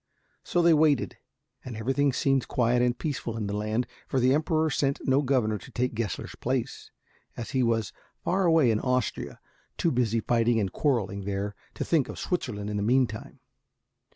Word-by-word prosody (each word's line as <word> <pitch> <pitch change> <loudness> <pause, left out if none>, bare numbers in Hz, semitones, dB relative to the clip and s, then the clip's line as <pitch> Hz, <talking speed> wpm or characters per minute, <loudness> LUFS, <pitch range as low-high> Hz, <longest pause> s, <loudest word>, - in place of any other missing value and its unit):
So 175 - +1
they 170 -1 +6
waited, 150 -5 +2 0.5
and 120 -4 -7
everything 135 +5 +1
seemed 135 0 +1
quiet 120 0 +2
and 125 0 +1
peaceful 130 -7 -3
in 110 - -2
the 100 0 -3
land, 110 +3 -1 0.2
for 135 - 0
the 130 +1 +4
Emperor 155 +1 +1
sent 140 0 0
no 135 +1 +4
governor 125 -6 +1
to - - -13
take 125 0 -1
Gessler's 110 -5 -3
place, 130 +1 -3 0.5
as 120 +3 -5
he 130 -2 +1
was 115 -4 0 0.3
far 190 +1 +1
away 160 -7 +5
in 110 - +1
Austria, 125 -3 -1 0.4
too 170 - +1
busy 115 -3 +1
fighting 115 0 +2
and 95 -3 -1
quarreling 100 -9 0
there 100 +1 -2 0.2
to - - -3
think 155 -6 +2
of - - -7
Switzerland 120 - -3
in 105 - -2
the - - -1
meantime. 115 0 0
125 Hz, 180 wpm, -27 LUFS, 110-140 Hz, 0.5 s, they